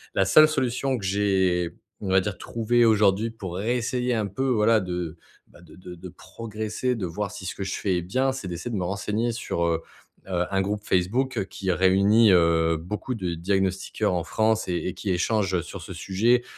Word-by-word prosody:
la 95 Hz, -, +3 dB
seule 155 Hz, +11 st, +7 dB
solution 130 Hz, -1 st, 0 dB
que 100 Hz, -, -6 dB
j'ai, 95 Hz, -3 st, +1 dB, 0.3 s
on 100 Hz, -, -4 dB
va 95 Hz, +1 st, +5 dB
dire, 95 Hz, 0 st, -3 dB
trouvée 120 Hz, +1 st, +1 dB
aujourd'hui 105 Hz, -1 st, +3 dB
pour 100 Hz, -6 st, -7 dB
réessayer 125 Hz, +4 st, -1 dB
un 110 Hz, -3 st, 0 dB
peu, 100 Hz, +8 st, -3 dB
voilà, 110 Hz, -2 st, +3 dB
de, 90 Hz, -2 st, -4 dB, 0.3 s
bah, 85 Hz, -, -19 dB
de 85 Hz, -, -16 dB
de 90 Hz, -1 st, -10 dB
de 90 Hz, +2 st, -10 dB
progresser, 110 Hz, +6 st, -4 dB
de 100 Hz, -5 st, -3 dB
voir 100 Hz, +5 st, -4 dB
si 95 Hz, -, -8 dB
ce 90 Hz, -, -4 dB
que 100 Hz, -, -4 dB
je 95 Hz, -, -3 dB
fais 95 Hz, -3 st, 0 dB
est -, -, -1 dB
bien, 130 Hz, +10 st, 0 dB
c'est 105 Hz, -9 st, -6 dB
d'essayer 85 Hz, +8 st, -5 dB
de -, -, -2 dB
me 90 Hz, -, -1 dB
renseigner 105 Hz, +5 st, -1 dB
sur, 110 Hz, -6 st, -3 dB
heu 80 Hz, -1 st, 0 dB, 0.5 s
heu, 90 Hz, -2 st, 0 dB
un 95 Hz, 0 st, +2 dB
groupe 105 Hz, +1 st, -2 dB
Facebook 110 Hz, +5 st, 0 dB
qui 95 Hz, -1 st, -2 dB
réunit, 100 Hz, +4 st, +4 dB
heu, 85 Hz, -2 st, +4 dB
beaucoup 105 Hz, +10 st, -4 dB
de 90 Hz, -5 st, -3 dB
diagnostiqueurs 95 Hz, +3 st, -1 dB
en 85 Hz, -2 st, -1 dB
France 110 Hz, -1 st, +1 dB
et 90 Hz, -, -1 dB
et 90 Hz, -, -3 dB
qui 95 Hz, +1 st, -3 dB
échangent, 95 Hz, +1 st, 0 dB
heu, 85 Hz, -, +1 dB
sur 90 Hz, +1 st, -9 dB
ce 95 Hz, -, -8 dB
sujet, 110 Hz, +8 st, +1 dB
100 Hz, 205 wpm, -25 LUFS, 90-115 Hz, 0.5 s, seule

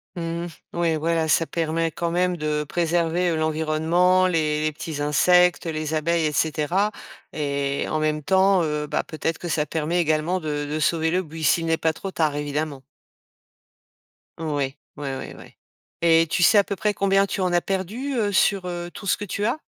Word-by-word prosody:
Mmh 170 Hz, 0 st, -3 dB, 0.3 s
mh, -, -, -7 dB
ouais, 165 Hz, -2 st, +2 dB
voilà, 165 Hz, +1 st, 0 dB
ça 165 Hz, +1 st, +3 dB
permet 165 Hz, 0 st, -1 dB
quand 170 Hz, +1 st, -2 dB
même 180 Hz, 0 st, +1 dB
de 150 Hz, -1 st, -1 dB
préserver, 170 Hz, +2 st, 0 dB
heu, 165 Hz, -, 0 dB
l'environnement, 160 Hz, +4 st, +2 dB
les 155 Hz, -3 st, 0 dB
les 155 Hz, -, +1 dB
petits 150 Hz, 0 st, -6 dB
insectes, 175 Hz, +3 st, +3 dB
heu, 165 Hz, -, -1 dB
les 155 Hz, 0 st, -3 dB
abeilles 165 Hz, +1 st, +1 dB
et 155 Hz, -, +1 dB
cetera 160 Hz, +7 st, 0 dB, 0.4 s
et 140 Hz, -2 st, -1 dB
en 155 Hz, -, 0 dB
même 155 Hz, -1 st, -1 dB
temps, 190 Hz, +2 st, +3 dB
heu, 150 Hz, -1 st, -2 dB
bah, -, -, -1 dB
peut-être 160 Hz, +1 st, -3 dB
que 175 Hz, -, -6 dB
ça 150 Hz, -1 st, 0 dB
permet 160 Hz, +3 st, -1 dB
également 160 Hz, +3 st, 0 dB
de 150 Hz, -3 st, -3 dB
de 150 Hz, +2 st, -3 dB
sauver 160 Hz, +1 st, +1 dB
le 185 Hz, +1 st, +1 dB
buis, 160 Hz, -1 st, -8 dB
s'il 165 Hz, +3 st, +3 dB
n'est 165 Hz, 0 st, +2 dB
pas 160 Hz, 0 st, 0 dB
trop 195 Hz, +5 st, -6 dB
tard, 155 Hz, -4 st, 0 dB
évidemment. 145 Hz, -1 st, -3 dB, 1.6 s
Oui, 145 Hz, -4 st, -2 dB, 0.2 s
oui, 145 Hz, -2 st, -4 dB
oui, -, -, -7 dB
oui. -, -, -14 dB, 0.5 s
Et 165 Hz, 0 st, +5 dB
tu 175 Hz, -, +1 dB
sais 205 Hz, +5 st, +6 dB
à -, -, +4 dB
peu 200 Hz, -, -4 dB
près 210 Hz, +2 st, 0 dB
combien 195 Hz, 0 st, +2 dB
tu 195 Hz, 0 st, -3 dB
en 180 Hz, -1 st, +1 dB
as 175 Hz, -, +3 dB
perdu, 205 Hz, +9 st, -3 dB
heu, 210 Hz, -4 st, +1 dB
sur, 195 Hz, -1 st, +2 dB
heu, 175 Hz, 0 st, -5 dB
tout 200 Hz, -, -8 dB
ce -, -, +2 dB
que 205 Hz, -, -5 dB
tu 205 Hz, +2 st, -3 dB
as? 235 Hz, -, 0 dB
165 Hz, 200 wpm, -23 LUFS, 155-180 Hz, 1.6 s, sais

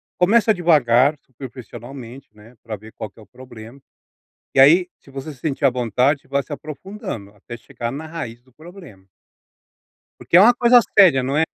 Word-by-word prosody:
começa 220 Hz, +5 st, +3 dB
devagar 150 Hz, -, +3 dB
superficialmente, 125 Hz, -1 st, -12 dB
né, 110 Hz, +4 st, -18 dB
pra 115 Hz, -2 st, -7 dB
ver 110 Hz, +2 st, -15 dB
qual 110 Hz, -, -7 dB
que -, -, -41 dB
é 110 Hz, -, -14 dB
o -, -, -20 dB
problema, 125 Hz, 0 st, -14 dB, 0.8 s
e 135 Hz, -, +6 dB
aí 170 Hz, +6 st, +5 dB
se 135 Hz, -, -20 dB
você 135 Hz, +3 st, -8 dB
se 130 Hz, -, -21 dB
sentir 145 Hz, -1 st, -2 dB
à -, -, +6 dB
vontade, 125 Hz, +3 st, 0 dB
você -, -, -27 dB
vai 140 Hz, 0 st, 0 dB
se 145 Hz, -, -9 dB
aprofundando 155 Hz, -, -8 dB
até 120 Hz, +4 st, -11 dB
chegar 120 Hz, 0 st, -7 dB
na 150 Hz, +4 st, -7 dB
raiz 125 Hz, -8 st, -8 dB
do 130 Hz, 0 st, -29 dB
problema. 160 Hz, -, -15 dB, 1.1 s
Porque 175 Hz, -, +1 dB
é -, -, +8 dB
uma 235 Hz, +5 st, +6 dB
coisa 245 Hz, 0 st, +5 dB, 0.2 s
séria 175 Hz, -11 st, +6 dB
não 135 Hz, +3 st, -2 dB
é? 160 Hz, -, +3 dB
135 Hz, 185 wpm, -20 LUFS, 120-160 Hz, 1.1 s, é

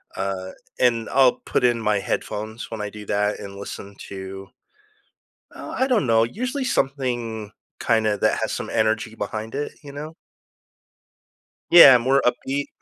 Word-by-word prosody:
uh, 95 Hz, -1 st, -3 dB, 0.3 s
and 115 Hz, -3 st, +2 dB
I'll 130 Hz, -1 st, +5 dB
put -, -, -1 dB
in 120 Hz, -2 st, +2 dB
my 105 Hz, -1 st, +1 dB
headphones 110 Hz, +3 st, -4 dB
when 110 Hz, -2 st, -5 dB
I 105 Hz, -, -3 dB
do 105 Hz, -1 st, -10 dB
that 105 Hz, +1 st, 0 dB
and 100 Hz, -1 st, -8 dB
listen 100 Hz, 0 st, -8 dB
to 95 Hz, 0 st, -8 dB, 1.1 s
uh, -, -, -8 dB
I 260 Hz, -, +3 dB
don't 235 Hz, -, +2 dB
know, 115 Hz, -1 st, +4 dB
usually, 255 Hz, -, -3 dB
something 120 Hz, -, -2 dB, 0.3 s
kinda 110 Hz, -3 st, +1 dB
that -, -, +2 dB
has -, -, -1 dB
some -, -, -4 dB
energy 110 Hz, 0 st, 0 dB
behind 110 Hz, +1 st, -5 dB
it, 145 Hz, +1 st, -3 dB
you 145 Hz, -, -9 dB
know? 150 Hz, +3 st, -8 dB, 1.6 s
Yeah, 140 Hz, -7 st, +10 dB
more 130 Hz, +3 st, +2 dB
upbeat. 135 Hz, +3 st, -1 dB
115 Hz, 150 wpm, -23 LUFS, 105-135 Hz, 1.6 s, Yeah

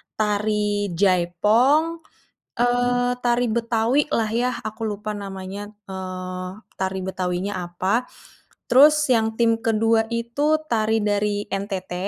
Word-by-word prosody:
tari 210 Hz, -1 st, 0 dB
jaipong, 210 Hz, -, +3 dB, 0.6 s
eee, 245 Hz, 0 st, +2 dB
tari 245 Hz, 0 st, +2 dB
Betawi-lah 230 Hz, +2 st, +1 dB
yah 245 Hz, +2 st, 0 dB
aku 220 Hz, 0 st, -3 dB
lupa 210 Hz, +1 st, -4 dB
namanya, 195 Hz, 0 st, -7 dB, 0.2 s
eee, 185 Hz, -1 st, -6 dB, 0.3 s
tari 190 Hz, 0 st, -1 dB
Betawi-nya 185 Hz, +1 st, -2 dB
apa, 185 Hz, +7 st, -1 dB, 0.6 s
terus 300 Hz, +4 st, +6 dB
yang 225 Hz, -1 st, 0 dB
tim 230 Hz, -1 st, +2 dB
ke-2 225 Hz, 0 st, +2 dB
itu 235 Hz, +7 st, 0 dB
tari 220 Hz, -4 st, +1 dB
dari 205 Hz, 0 st, 0 dB
NTT. 195 Hz, -2 st, -4 dB
215 Hz, 105 wpm, -23 LUFS, 195-240 Hz, 0.6 s, terus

